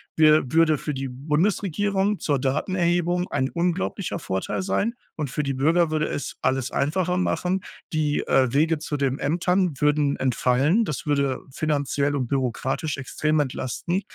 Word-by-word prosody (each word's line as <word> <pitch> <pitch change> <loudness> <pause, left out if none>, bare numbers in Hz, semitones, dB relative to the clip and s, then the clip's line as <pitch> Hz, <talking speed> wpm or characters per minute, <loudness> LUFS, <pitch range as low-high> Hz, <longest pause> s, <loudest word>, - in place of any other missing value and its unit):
wir 155 -4 +4
würde 160 -2 +4
für 150 - -3
die 135 0 -3
Bundesregierung 190 +8 0
zur 145 -3 0
Datenerhebung 175 +5 0
ein 130 +1 0
unglaublicher 180 +2 -1
Vorteil 95 - -3
sein 230 +4 0 0.2
und 150 -3 -2
für 150 +3 -2
die 140 - -1
Bürger 160 +5 +2
würde 155 -1 0
es 145 - -4
alles 130 0 0
einfacher 180 +6 0
machen. 185 +1 0 0.3
Die, 150 -2 +1
äh, 130 -2 +3
Wege 155 +3 +2
zu 150 -1 -3
den 135 -1 0
Ämtern 175 -1 +1
würden 150 -1 +2
entfallen, 130 - +2
das 150 -8 -4
würde 140 -3 +1
finanziell 145 -1 0
und 135 -3 0
bürokratisch 135 +3 -1
extrem 150 +3 -1
entlasten 145 +6 -2
150 Hz, 150 wpm, -24 LUFS, 135-175 Hz, 0.3 s, wir